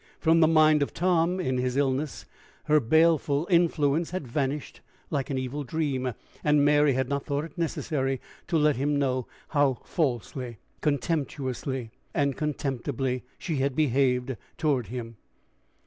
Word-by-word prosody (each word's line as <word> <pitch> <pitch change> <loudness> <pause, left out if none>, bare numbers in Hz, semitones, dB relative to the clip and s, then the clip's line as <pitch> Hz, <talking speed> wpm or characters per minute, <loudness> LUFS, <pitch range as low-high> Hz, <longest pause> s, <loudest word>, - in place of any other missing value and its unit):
From 165 0 +4
the 160 - +6
mind 155 -1 +5
of 140 - -1
Tom, 175 0 +2
in 130 -8 0
his 125 +1 -1
illness, 140 +1 -1 0.4
her 150 0 +4
baleful 155 +2 +3
influence 165 -2 +3
had 180 -7 -4
vanished 140 +3 -3 0.3
like 140 -3 -1
an 135 - -1
evil 130 +3 -3
dream, 130 -4 -2 0.3
and 150 -1 +4
Mary 145 -1 +4
had 130 0 0
not 140 0 -2
thought 145 +1 -1
it 160 - -12
necessary 140 -5 -1 0.3
to 170 - +1
let 150 -3 +3
him 145 +2 +1
know 130 -3 0 0.2
how 145 -3 +3
falsely, 125 - -2 0.2
contemptuously, 135 -4 -2 0.2
and 140 -2 +1
contemptibly, 135 -3 -2 0.2
she 160 -5 -3
had 135 0 0
behaved 130 -3 +1 0.2
toward 140 -8 +1
him. 115 0 -6
140 Hz, 145 wpm, -27 LUFS, 130-155 Hz, 0.4 s, the